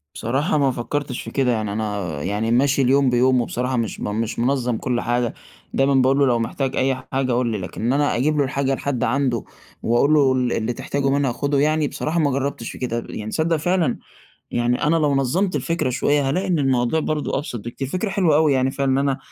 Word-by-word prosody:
بصراحة، 135 +8 0
ما 140 -2 +3
فكرتش 130 +2 -3
في - - -8
كده 130 -3 +1
يعني، 110 -3 -1
أنا 100 -8 -3
يعني 105 +4 -1
ماشي 135 +3 +3
اليوم 135 +1 +3
بيومُه 125 0 +3
بصراحة، 125 +2 -2
مش 115 -2 -2
مش 110 +2 -3
منظَّم 125 -1 0
كل 125 0 -1
حاجة، 120 -1 0 0.4
دايمًا 135 +1 +2
باقول 135 +1 +3
له: 140 - +5
"لو 120 -2 +2
محتاج 130 +4 -2
أي 130 0 +1 0.2
حاجة، 135 -1 0
قل 120 0 +1
لي." 110 -2 -1
لكن 95 -2 -7
إن 120 +3 +1
أنا 145 +1 +1
أجيب 150 +5 +1
له 145 - +3
الحاجة 135 0 0
لحد 130 -2 -2
عنده 125 -2 0 0.4
وأقول 120 +6 +3
له 140 -3 +4
ال 125 -2 0
اللي 115 +2 -1
تحتاجُه 140 +3 -2
منها 140 -2 +1
خدُه 140 +3 0
يعني، 155 +1 +2
بصراحة 160 +4 -2
ما 145 -3 +2
جرّبتش 135 -3 -2
في - - -10
كده، 120 -2 -3
يعني 110 0 -6
تصدَّق 165 +5 +1
فعلًا 165 -3 0 0.5
يعني 120 +1 0
أنا 150 +3 +3
لو 150 -3 +2
نظَّمت 170 +9 0
الفكرة 165 -6 -1
شوية، 140 +2 +1
هالاقي 185 +7 -1
إن 175 -4 +1
الموضوع 130 +1 +1
برضه 155 -1 -1
أبسط 125 -5 -4
بكتير. 125 +3 -5
فكرة 185 +9 -2
حلوة 185 -6 +2
أوي 155 -1 +4
يعني 130 0 +1
فعلًا 135 -1 0
إن 130 - +2
أنا 140 -1 +1
135 Hz, 215 wpm, -21 LUFS, 120-145 Hz, 0.5 s, له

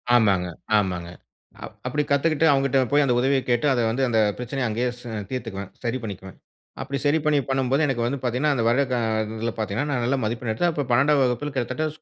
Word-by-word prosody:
ஆமாங்க, 100 -6 +3 0.3
ஆமாங்க. 90 -4 -1 0.8
அப்படி 150 0 0
கத்துக்கிட்டு 155 +2 +2
அவங்க 135 -1 +2
கிட்ட 135 0 +2
போய் 145 0 +4
அத 125 - +2
உதவியக் 135 +1 +1
கேட்டு 120 +4 +2
அத 120 - +1
வந்து, 125 +4 0
அத 115 -2 +2 0.2
பிரச்சனைய 125 +1 -2
அங்கேயே 120 +3 0
ச - - -14 0.3
தீர்த்துக்குவேன். 105 -7 -5
சரி 120 +1 -1
பண்ணிக்குவேன். 95 -3 -8 0.4
அப்படி 140 +1 -3
சரி 145 +3 +3
பண்ணி 150 -1 +3
பண்ணும்போது, 135 +3 +1
எனக்கு 120 -3 0
வந்து 135 +3 -2
பாத்தீங்கன்னா, 130 +5 +1
அந்த 120 - 0
வருட 130 +4 +3
க - - +1 0.4
இதுல 115 +1 -2
பாத்தீங்கன்னா, 110 +7 -2
நான் 125 -4 0
நல்ல 135 +3 +1
மதிப்பெண் 115 +1 -2
எடுத்தேன். 170 +11 +1
அப்போ 145 -2 -2
12ம் 140 +3 +4
வகுப்புல 130 +4 -1
கிட்டத்தட்ட 130 +5 -1
125 Hz, 195 wpm, -24 LUFS, 115-140 Hz, 0.8 s, போய்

